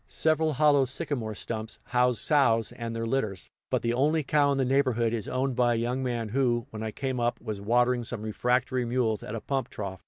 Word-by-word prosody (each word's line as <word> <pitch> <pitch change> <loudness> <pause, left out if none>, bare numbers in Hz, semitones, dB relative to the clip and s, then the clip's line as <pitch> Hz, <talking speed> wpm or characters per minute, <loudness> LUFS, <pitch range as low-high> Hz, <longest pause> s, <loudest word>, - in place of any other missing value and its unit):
Several 155 0 +1
hollow 145 -1 +4
sycamore 130 -5 -3
stumps 110 +1 -4
house 125 -1 +2
sows 115 -7 +3
and 115 -1 -5
their 115 0 -2
litters; 110 - -2 0.2
but - - 0
the 115 0 +1
only 150 +5 +2
cow 145 +1 +3
in 140 - 0
the 135 - +1
neighborhood 125 -4 +2
is 110 -3 -3
owned 130 0 -1
by 120 -1 +3
a - - 0
young 120 +3 -1
man 120 -4 -2
who, 120 -1 +1
when 110 - -6
I 110 - -2
came 130 +3 -3
up, 120 0 0
was 105 -2 -5
watering 120 +3 +2
some 115 -2 -5
refractory 125 +3 0
mules 120 -3 0
at 105 - -6
a 110 - -4
pump 135 +3 -2
trough. 95 -3 -6
120 Hz, 215 wpm, -28 LUFS, 115-135 Hz, 0.2 s, hollow